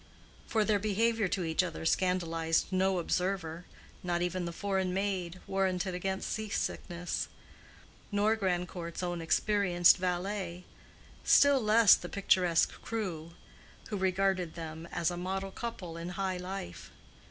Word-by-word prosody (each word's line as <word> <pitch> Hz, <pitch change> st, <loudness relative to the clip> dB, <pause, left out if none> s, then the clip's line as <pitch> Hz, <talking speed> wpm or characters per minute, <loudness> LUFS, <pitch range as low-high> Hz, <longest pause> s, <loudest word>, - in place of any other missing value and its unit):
For 220 Hz, -2 st, +1 dB
their 210 Hz, -1 st, +2 dB
behavior 215 Hz, +1 st, +1 dB
to 185 Hz, 0 st, -1 dB
each 160 Hz, +1 st, +1 dB
other 170 Hz, -3 st, -5 dB
scandalized 165 Hz, -2 st, +1 dB
no 190 Hz, 0 st, +2 dB
observer—not 175 Hz, 0 st, -3 dB
even 180 Hz, 0 st, -2 dB
the 170 Hz, -, -3 dB
foreign 190 Hz, 0 st, -1 dB
maid, 190 Hz, -3 st, -2 dB
warranted 190 Hz, -1 st, 0 dB
against 190 Hz, +2 st, -3 dB
sea 220 Hz, -1 st, -4 dB
sickness; 175 Hz, -3 st, -3 dB, 0.8 s
nor 210 Hz, +2 st, +3 dB
Grandcourt's 180 Hz, -3 st, -3 dB
own 175 Hz, -1 st, -2 dB
experienced 175 Hz, 0 st, +4 dB
valet: 180 Hz, 0 st, -2 dB, 0.6 s
still 285 Hz, -2 st, +6 dB
less 215 Hz, -1 st, +7 dB
the 175 Hz, -, 0 dB
picturesque 180 Hz, -4 st, +2 dB
crew, 170 Hz, -8 st, -4 dB, 0.6 s
who 210 Hz, -, -2 dB
regarded 190 Hz, -2 st, 0 dB
them 160 Hz, 0 st, -7 dB
as 170 Hz, +1 st, 0 dB
a 175 Hz, -, -5 dB
model 190 Hz, +2 st, -3 dB
couple 190 Hz, -8 st, -6 dB
in 170 Hz, +1 st, -5 dB
high 190 Hz, 0 st, -2 dB
life. 180 Hz, -, -6 dB
185 Hz, 130 wpm, -31 LUFS, 175-195 Hz, 0.8 s, less